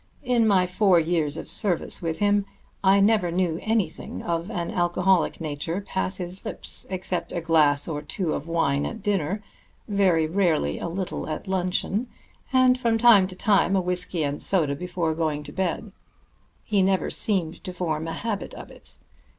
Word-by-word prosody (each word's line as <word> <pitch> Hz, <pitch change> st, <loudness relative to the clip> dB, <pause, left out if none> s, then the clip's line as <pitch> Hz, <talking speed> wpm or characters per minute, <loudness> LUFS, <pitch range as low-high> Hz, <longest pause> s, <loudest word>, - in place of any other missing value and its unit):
In 245 Hz, -3 st, +2 dB
my 190 Hz, -3 st, +4 dB
four 185 Hz, -1 st, +3 dB
years 160 Hz, -2 st, 0 dB
of -, -, -6 dB
service 185 Hz, -6 st, 0 dB
with 165 Hz, -2 st, -2 dB
him 205 Hz, -1 st, +2 dB, 0.4 s
I 195 Hz, +1 st, +5 dB
never 200 Hz, -3 st, +3 dB
knew 170 Hz, -1 st, 0 dB
anything 220 Hz, -2 st, -2 dB
of 170 Hz, +2 st, -2 dB
an 175 Hz, -6 st, -3 dB
alcoholic 175 Hz, 0 st, +1 dB
nature 160 Hz, +3 st, -3 dB
pass 190 Hz, -1 st, -3 dB
his 180 Hz, +1 st, -7 dB
lips -, -, -5 dB
except 185 Hz, -2 st, -3 dB
a -, -, -2 dB
glass 155 Hz, -3 st, +3 dB
or 150 Hz, -3 st, -3 dB
two 160 Hz, +2 st, -2 dB
of 150 Hz, -, -4 dB
wine 145 Hz, -4 st, +1 dB
at 225 Hz, -4 st, -7 dB
dinner, 200 Hz, -1 st, -1 dB, 0.4 s
very 190 Hz, -6 st, +3 dB
rarely 160 Hz, -, +1 dB
a -, -, -3 dB
little 180 Hz, -1 st, -4 dB
at 155 Hz, -, -5 dB
luncheon, 190 Hz, +5 st, 0 dB, 0.4 s
and 255 Hz, -1 st, +4 dB
from 230 Hz, -3 st, +2 dB
time 225 Hz, -5 st, +6 dB
to 185 Hz, -, -7 dB
time 195 Hz, -2 st, +3 dB
a -, -, +3 dB
whisky 180 Hz, -2 st, -1 dB
and 145 Hz, 0 st, -2 dB
soda 155 Hz, -7 st, +1 dB
before 175 Hz, 0 st, -2 dB
going 155 Hz, -2 st, -1 dB
to -, -, -8 dB
bed. 190 Hz, +3 st, -2 dB, 0.7 s
He 205 Hz, -3 st, +1 dB
never 190 Hz, 0 st, +1 dB
seemed 180 Hz, -6 st, -1 dB
to 185 Hz, -, -5 dB
form 165 Hz, -3 st, -3 dB
a 165 Hz, -, -3 dB
habit 205 Hz, +3 st, -4 dB
of -, -, -10 dB
it. -, -, -13 dB
180 Hz, 175 wpm, -25 LUFS, 165-200 Hz, 0.7 s, time